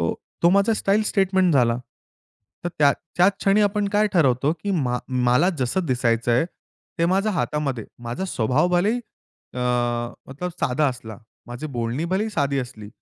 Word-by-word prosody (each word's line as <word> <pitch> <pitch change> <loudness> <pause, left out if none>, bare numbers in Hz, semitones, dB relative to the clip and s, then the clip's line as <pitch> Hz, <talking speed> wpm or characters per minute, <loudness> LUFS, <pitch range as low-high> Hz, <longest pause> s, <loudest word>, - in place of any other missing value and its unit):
हो, 85 - 0 0.3
तो 170 - +6
माझा 200 +4 +3
स्टाईल 205 +2 +2
स्टेटमेंट 190 -3 +2
झाला. 120 -3 +3 0.9
तर - - 0
त्या 140 -2 +5 0.2
त्या 180 +2 +6
क्षणी 200 +1 +2
आपण 205 0 +1
काय 210 +1 +2
ठरवतो, 140 -3 +3
की 170 +5 -5 0.2
मा 125 0 0 0.3
मला 145 +9 +4
जसं 135 +8 0
दिसायचंय, 120 -1 +1 0.5
ते 170 - +2
माझ्या 195 +4 +1
हातामध्ये. 150 - -2 0.2
माझा 125 +11 -3
स्वभाव 130 +9 +2
भलेही 215 +7 +1 0.5
अ, - - -5 0.8
तर 180 - -1
साधा 140 +4 +1
असला. 110 -4 -7 0.3
माझी 120 +5 -6
बोलणी 120 +6 -2
भलेही 195 +5 -1
साधी 140 -7 0
असली. 120 -5 -6
155 Hz, 150 wpm, -23 LUFS, 125-195 Hz, 0.9 s, तो